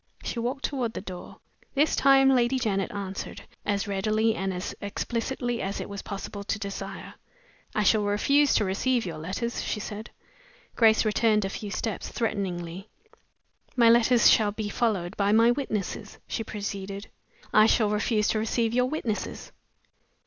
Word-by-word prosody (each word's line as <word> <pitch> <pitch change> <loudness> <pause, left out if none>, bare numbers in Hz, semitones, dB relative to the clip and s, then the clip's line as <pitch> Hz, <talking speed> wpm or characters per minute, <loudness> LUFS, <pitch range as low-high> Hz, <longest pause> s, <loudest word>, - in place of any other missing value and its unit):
She 235 - -3
walked 255 +4 -2
toward 250 -6 -2
the - - -4
door. 185 -2 -9 0.4
This 295 +2 +3
time 270 -1 +5
Lady 255 0 +3
Janet 200 -6 -1
answered, 195 -1 -6 0.2
as 205 -1 0
readily 215 +3 +1
and 195 -3 -2
as 180 0 -4
explicitly 240 +4 -2
as 195 +1 -3
it - - -5
was 200 -1 -6
possible 200 0 -6
to 215 - -2
desire. 200 -2 -6 0.6
"I 215 - +2
shall 215 +2 +4
refuse 280 +8 +3
to 210 - +3
receive 230 +5 0
your 165 -3 -5
letters," 195 +9 -3
she 210 - -2
said. 210 +1 -6 0.7
Grace 220 -1 +5
returned 215 -1 +2
a - - -2
few 205 +1 -6
steps, 215 +1 -3
threateningly. 190 -3 -3 0.9
"My 235 -2 +6
letters 235 +1 +5
shall 210 -2 +5
be 215 0 -4
followed 205 -6 -1
by 200 0 +2
my 230 +2 +6
witnesses," 215 -5 -3
she 225 - -3
proceeded. 200 -2 -6 0.4
"I 215 +1 +7
shall 215 -2 +3
refuse 210 0 +1
to 215 - +1
receive 225 +1 0
your 250 +1 +2
witnesses." 245 -8 -4
215 Hz, 155 wpm, -27 LUFS, 200-235 Hz, 0.9 s, I